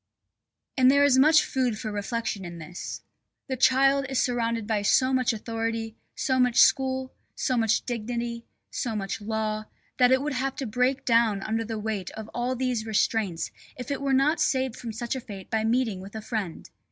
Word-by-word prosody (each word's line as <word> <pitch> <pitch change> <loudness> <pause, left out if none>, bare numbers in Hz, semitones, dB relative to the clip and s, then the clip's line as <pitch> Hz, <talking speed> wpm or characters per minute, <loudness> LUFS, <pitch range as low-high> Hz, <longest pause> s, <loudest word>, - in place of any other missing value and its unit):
And 255 -1 +6
there 280 +1 +5
is 270 -2 +5
much 310 +3 +6
food 250 -5 0
for 215 0 -4
reflection 205 0 -3
in 175 -1 -7
this. 165 +2 -7 0.4
The 265 - -2
child 270 +2 +4
is 265 -1 0
surrounded 230 -3 0
by 215 -1 0
so 255 +5 +3
much 255 -2 +2
authority, 225 0 -3 0.2
so 260 -4 0
much 250 -2 +2
school, 260 -1 +3 0.2
so 255 - 0
much 225 -2 +1
dignity, 235 0 -3 0.3
so 230 -3 -2
much 195 +1 -3
law, 215 0 -2 0.3
that 250 0 +6
it 260 +1 +4
would 300 -1 -2
have 270 +1 -2
to 270 - -4
break 250 +4 0
down 230 -4 +3
under 225 +1 -1
the 225 0 -4
weight 210 -4 -3
of 220 0 -8
all 245 +2 -1
these 250 -3 -1
restraints 215 -5 0 0.3
if 255 +3 -6
it 280 - -2
were 275 -1 0
not 275 +5 +3
saved 260 -3 +1
from 235 - -6
such 235 +3 -3
a 260 - -4
fate 195 -5 -10
by 220 -1 +1
meeting 225 -3 +1
with 195 +3 -10
a 220 - -4
friend. 210 -8 -4
235 Hz, 190 wpm, -26 LUFS, 220-260 Hz, 0.4 s, And